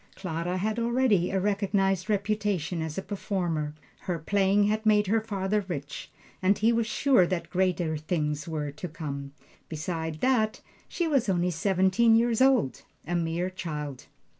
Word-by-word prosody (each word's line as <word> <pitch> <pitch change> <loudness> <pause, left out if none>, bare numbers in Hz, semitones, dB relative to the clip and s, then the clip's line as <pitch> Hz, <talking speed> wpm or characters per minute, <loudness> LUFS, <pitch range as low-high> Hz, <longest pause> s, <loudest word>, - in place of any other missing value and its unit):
Clara 175 0 -3
had 215 +4 -1
already 235 -6 +2
a 190 - 0
recognized 195 -1 0
reputation 205 -5 -1
as 160 -1 -4
a 195 - -2
performer; 175 -7 -2 0.2
her 180 -2 -3
playing 195 +4 +2
had 215 +1 +1
made 210 -1 +4
her 220 +3 +2
father 205 -1 -1
rich, 145 -6 -6 0.3
and 190 +2 +3
he 225 +3 +3
was 230 -1 +1
sure 230 -4 +3
that 180 -2 -3
greater 180 -3 +1
things 150 -1 -2
were 150 -3 -3
to 150 +5 -6
come. 140 -4 -6 0.4
Beside 160 0 -4
that, 230 -5 +2 0.3
she 345 - -1
was 275 -9 +1
only 180 -1 +1
seventeen 190 +6 +3
years 235 +1 +2
old 260 - +3 0.2
a 175 - -3
mere 170 +2 -1
child. 150 -7 -6
190 Hz, 155 wpm, -27 LUFS, 165-215 Hz, 0.4 s, made